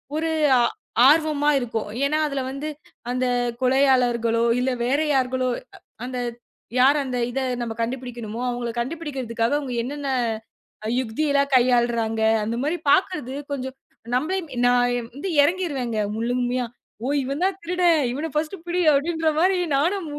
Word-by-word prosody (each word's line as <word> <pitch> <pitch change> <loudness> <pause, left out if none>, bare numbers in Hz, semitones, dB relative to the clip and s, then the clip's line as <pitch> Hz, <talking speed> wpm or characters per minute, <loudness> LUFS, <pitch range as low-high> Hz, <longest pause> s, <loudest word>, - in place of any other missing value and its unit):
ஒரு 325 +1 0 0.8
ஆர்வமா 300 -1 +3
இருக்கும். 225 -3 -3 0.2
ஏன்னா 305 +2 +1
அதுல 275 -2 -2
வந்து 275 +3 -5 0.4
அந்தக் 245 -1 0
கொலையாளர்களோ 250 -3 +3 0.2
இல்ல 260 +1 +1
வேற 275 +4 +2
யார்களோ 255 -1 +1 0.6
அந்த 255 0 -5 0.6
யாரு 275 +4 +6
அந்த 250 -1 -3
இத 270 - -2 0.2
நம்ம 230 -1 -3
கண்டுபிடிக்கணுமோ, 240 -2 -4
அவங்கள 240 -1 -3
கண்டுபிடிக்கறதுக்காக 260 -4 -2
அவங்க 260 -4 -5
என்னென்ன 280 +2 -4 0.9
யுக்தியெல்லாம் 280 +3 0
கையாளுறாங்க. 235 -3 +2 0.2
அந்த 225 +2 -2
மாரி 320 +4 0
பாக்குறது 305 -9 +1 0.2
கொஞ்சம் 265 -1 -4 0.4
நம்மள 310 +9 0 0.3
நான் 245 -1 +2 0.3
இறங்கிருவேன் 285 -8 0 0.2
முழுமையா. 245 +1 0 0.4
ஓ! - - -1 0.2
இவன் 275 +5 -3
தான் 380 0 +2
திருடன். 345 -3 +3
இவனைப் 300 +3 -4 0.3
புடி. 355 +1 0
அப்படின்னு 320 +2 +1
மாதிரி 370 +2 +3 0.2
நானும் 345 +6 +1
260 Hz, 120 wpm, -23 LUFS, 245-300 Hz, 0.9 s, யாரு